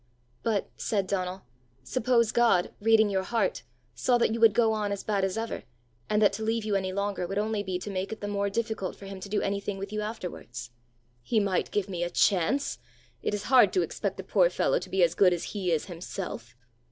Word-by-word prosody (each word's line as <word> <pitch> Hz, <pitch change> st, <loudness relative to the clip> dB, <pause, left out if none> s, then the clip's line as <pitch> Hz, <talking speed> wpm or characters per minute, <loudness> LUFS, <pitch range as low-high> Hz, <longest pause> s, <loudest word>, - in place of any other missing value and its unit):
"But," 215 Hz, -4 st, -1 dB
said 200 Hz, -3 st, 0 dB
Donal, 185 Hz, -1 st, -2 dB, 0.4 s
"suppose 235 Hz, -, +2 dB
God, 230 Hz, -7 st, +3 dB
reading 220 Hz, -1 st, +5 dB
your 190 Hz, -1 st, +1 dB
heart, 230 Hz, +5 st, 0 dB, 0.3 s
saw 250 Hz, -1 st, +2 dB
that 235 Hz, -, +2 dB
you 230 Hz, -, -2 dB
would 225 Hz, -3 st, +6 dB
go 225 Hz, -2 st, +4 dB
on 210 Hz, -2 st, -1 dB
as 200 Hz, -, -3 dB
bad 200 Hz, -2 st, 0 dB
as 190 Hz, +2 st, 0 dB
ever, 225 Hz, 0 st, -3 dB, 0.5 s
and 210 Hz, -, +2 dB
that 205 Hz, -, +5 dB
to 220 Hz, -, -4 dB
leave 225 Hz, 0 st, 0 dB
you 215 Hz, -, -1 dB
any 190 Hz, -1 st, 0 dB
longer 200 Hz, -2 st, -2 dB
would 195 Hz, +2 st, -4 dB
only 215 Hz, 0 st, 0 dB
be 190 Hz, -2 st, -2 dB
to 200 Hz, +3 st, -6 dB
make 190 Hz, +1 st, -3 dB
it 220 Hz, -, -5 dB
the 205 Hz, -, -4 dB
more 200 Hz, 0 st, 0 dB
difficult 220 Hz, -3 st, -2 dB
for 200 Hz, -, -12 dB
him 195 Hz, -1 st, -7 dB
to 200 Hz, -, -8 dB
do 210 Hz, -, 0 dB
anything 200 Hz, 0 st, -2 dB
with 200 Hz, +2 st, -6 dB
you 210 Hz, -, -1 dB
afterwards?" 175 Hz, -, -6 dB, 0.5 s
"He 220 Hz, -, +1 dB
might 195 Hz, -3 st, 0 dB
give 205 Hz, -2 st, -1 dB
me 180 Hz, -3 st, -4 dB
a 175 Hz, -, -1 dB
chance! 200 Hz, +11 st, +2 dB, 0.4 s
It -, -, -1 dB
is 205 Hz, -, -4 dB
hard 255 Hz, -, +7 dB
to 365 Hz, -, +3 dB
expect -, -, -3 dB
a -, -, -4 dB
poor -, -, +3 dB
fellow -, -, +1 dB
to -, -, -9 dB
be 190 Hz, -1 st, +2 dB
as 170 Hz, -1 st, +3 dB
good 180 Hz, -1 st, +5 dB
as 175 Hz, -, -3 dB
he 190 Hz, -4 st, -1 dB
is 160 Hz, -2 st, +1 dB
himself!" 170 Hz, -, -6 dB
200 Hz, 225 wpm, -28 LUFS, 185-220 Hz, 0.5 s, hard